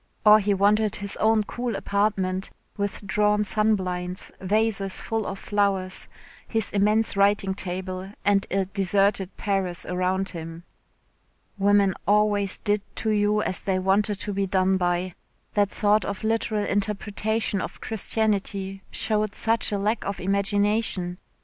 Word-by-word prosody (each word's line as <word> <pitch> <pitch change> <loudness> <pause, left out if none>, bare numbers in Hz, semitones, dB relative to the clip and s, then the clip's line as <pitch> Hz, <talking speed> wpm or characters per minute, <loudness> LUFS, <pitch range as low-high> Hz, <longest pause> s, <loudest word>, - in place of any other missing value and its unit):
Or 210 0 +8
he 205 -1 +1
wanted 210 +2 +2
his 200 -1 -4
own 220 0 +3
cool 240 +1 -4
apartment, 195 -2 0 0.3
with 200 0 -3
drawn 210 +1 +2
sunblinds, 185 -4 0
vases 200 0 0
full 225 -2 -2
of 195 - -4
flowers, 195 -2 -1 0.4
his 225 -2 -1
immense 210 +2 +2
writing 200 -1 +2
table, 185 0 -5
and 200 -1 +3
a 195 0 0
deserted 195 0 +1
Paris 195 -3 -1
around 185 +2 -1
him. 165 -1 -7 1.0
Women 200 -1 +4
always 205 -1 +3
did 205 0 0
to 220 - -1
you 210 0 +2
as 185 - -2
they 190 -1 0
wanted 200 +2 +1
to 205 - -3
be 195 0 -1
done 190 0 +2
by. 175 0 -1 0.4
That 205 -1 +2
sort 210 0 +3
of 200 +1 -5
literal 220 -1 0
interpretation 210 0 -1
of - - -6
Christianity 200 -3 -2
showed 215 -1 -1
such 225 0 +1
a 205 - 0
lack 210 +3 0
of 200 0 -4
imagination. 200 -1 0
200 Hz, 135 wpm, -25 LUFS, 190-210 Hz, 1.0 s, Or